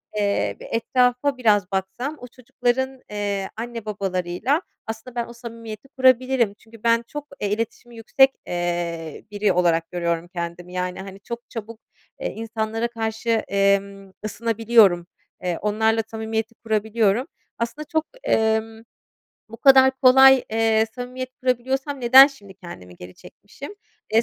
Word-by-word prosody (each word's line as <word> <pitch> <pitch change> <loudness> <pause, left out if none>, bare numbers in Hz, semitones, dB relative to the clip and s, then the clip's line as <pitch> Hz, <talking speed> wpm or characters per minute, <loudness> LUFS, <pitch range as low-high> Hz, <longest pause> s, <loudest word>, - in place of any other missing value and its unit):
eee, 205 -1 0
ve - - -9
etrafa 250 +4 +1
biraz 205 -6 +2
baksam 195 +10 -3
o 250 - -9
çocukların, 255 +1 -2
eee, 205 -2 -3
anne 230 -1 -6
babalarıyla 195 - -1 0.3
aslında 225 +3 -7
ben 235 -1 -1
o 235 - -11
samimiyeti 230 0 -9
kurabilirim. 255 -3 +3
Çünkü 225 -1 -17
ben 230 0 +3
çok, 295 +2 -7
eee, 205 - -1
iletişimi 230 +2 -4
yüksek, 265 +4 +4 0.2
eee, 170 -2 -3
biri 205 -1 +1
olarak 165 -2 +1
görüyorum 170 -1 -2
kendimi 175 0 -6
yani 180 0 -3
hani 195 0 -10
çok 235 +4 -8
çabuk, 225 -1 -8 0.4
eee, - - -4
insanlara 225 +1 -3
karşı, 225 0 -4 0.2
emm, 200 0 0
ısınabiliyorum. 220 -5 +3 0.4
Eee, 175 -2 -1
onlarla 220 +2 +1
samimiyeti 220 0 -4
kurabiliyorum. 220 +2 0 0.3
Aslında 235 +6 -4
çok, 315 0 +1 0.2
ımm, 220 0 +1 0.7
bu 225 - -10
kadar 265 +1 +7
kolay, 265 0 +7
eee, 225 0 +2
samimiyet 255 +1 -6
kurabiliyorsam 265 +3 -1
neden 260 +3 +9
şimdi 205 -9 -12
kendimi 90 - -12
geri 90 +1 -11
çekmişim? 280 - -12 0.4
Eee, 225 - +5
225 Hz, 135 wpm, -23 LUFS, 200-245 Hz, 0.7 s, neden